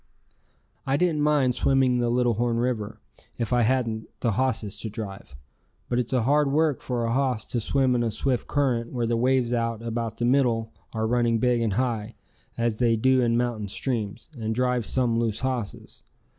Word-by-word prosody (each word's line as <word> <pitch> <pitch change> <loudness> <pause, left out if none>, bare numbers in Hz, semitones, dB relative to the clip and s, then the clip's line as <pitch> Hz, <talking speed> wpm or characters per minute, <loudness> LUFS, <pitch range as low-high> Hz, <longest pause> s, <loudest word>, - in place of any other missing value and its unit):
I 135 +1 +1
didn't 165 -2 +1
mind 145 -4 +3
swimming 130 -1 +2
the 120 -1 +1
Little 120 0 +2
Horn 115 +1 0
River, 115 -3 -2 0.4
if 115 0 -2
I 120 - +4
hadn't 115 -2 0
the 115 - +1
hosses 110 -3 -1
to 110 - -4
drive, 100 - -8 0.5
but 120 - +1
it's 120 - -2
hard 135 +3 +2
work 155 -1 +2
for 120 -2 -2
a 115 - -1
hoss 130 -3 0
to 120 - -2
swim 130 +3 +1
in 120 - +1
a 115 - +1
swift 120 +3 -1
current 125 -5 0
where 120 -2 0
the 115 0 0
waves 125 0 +2
out 115 -1 -1
about 115 -1 -3
the 120 - -1
middle 120 -4 +2 0.2
are 110 -1 -2
running 120 0 +2
big 120 0 +2
and 110 -3 0
high, 115 -2 -1 0.4
as 115 -2 0
they 120 -2 +3
do 130 +3 +3
in 115 -1 +2
mountain 120 -4 -1
streams, 115 +3 -3
and 110 -2 -3
drive 125 -1 0
some 120 -3 +1
loose 115 -3 -1
hosses. 125 -5 -4
120 Hz, 185 wpm, -25 LUFS, 115-130 Hz, 0.5 s, I